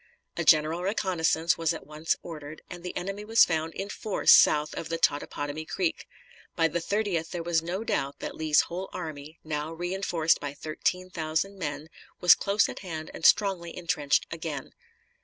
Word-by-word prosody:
A 170 - -1
general 160 +2 +4
reconnoissance 175 -4 +1
was 165 0 +1
at - - -9
once 155 +2 -1
ordered, 155 -2 -9
and 175 -1 -7
the 180 0 -5
enemy 195 +3 -4
was 225 +2 +6
found 160 -1 -2
in 195 - -4
force 210 -1 +2
south 150 0 +6
of 160 - -5
the 165 - -1
Totopotomoy 145 0 -1
Creek; 180 -4 -2 0.5
by 165 - +3
the 170 +2 -2
30th 195 -4 -1
there 175 -1 -4
was 165 -1 +1
no 180 +6 -3
doubt 140 -10 -2
that - - -5
Lee's 155 -1 +3
whole 185 +3 -6
army, 155 0 -7
now 155 0 -3
re 175 +2 -4
enforced 170 -4 +1
by 145 -1 -5
thirteen 180 +5 -2
thousand 165 +5 -2
men, 150 -2 -4 0.3
was 180 - +8
close 200 +1 +2
at - - -7
hand 160 -5 -6
and - - +3
strongly 190 -5 +2
intrenched 150 -5 +1
again. 160 -4 -5
165 Hz, 175 wpm, -28 LUFS, 155-180 Hz, 0.5 s, was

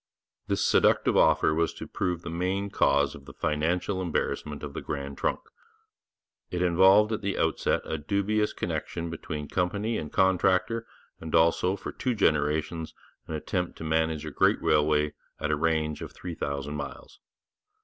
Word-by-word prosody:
This - - +1
seductive - - +3
offer 75 - +4
was 85 +1 0
to - - -7
prove 85 -1 -2
the - - -5
main 95 +4 -1
cause 70 -6 +3
of 70 - -12
the - - -11
financial 85 +5 0
embarrassment 75 -3 -2
of 70 - -6
the - - -5
Grand 70 -1 -5
Trunk. - - -1 1.1
It 90 0 -1
involved 95 +5 +5
at 110 - -2
the 100 -1 -2
outset 80 - +1
a 80 - -3
dubious 100 +6 0
connection 85 -1 -4
between 75 -2 -5
company 100 +7 -1
and 75 - -6
contractor, 95 +4 +2 0.3
and 80 -1 -3
also 85 +3 +3
for 100 - -6
two 125 -2 -2
generations 80 -2 0 0.3
an 80 - -4
attempt 90 +3 -3
to - - -7
manage 80 -1 0
a 75 - -5
great - - +3
railway 75 0 +2 0.3
at 75 - -1
a - - +3
range 80 -1 0
of - - -7
three 90 -1 -7
thousand 70 -1 -3
miles. 70 - -8
80 Hz, 160 wpm, -27 LUFS, 75-95 Hz, 1.1 s, involved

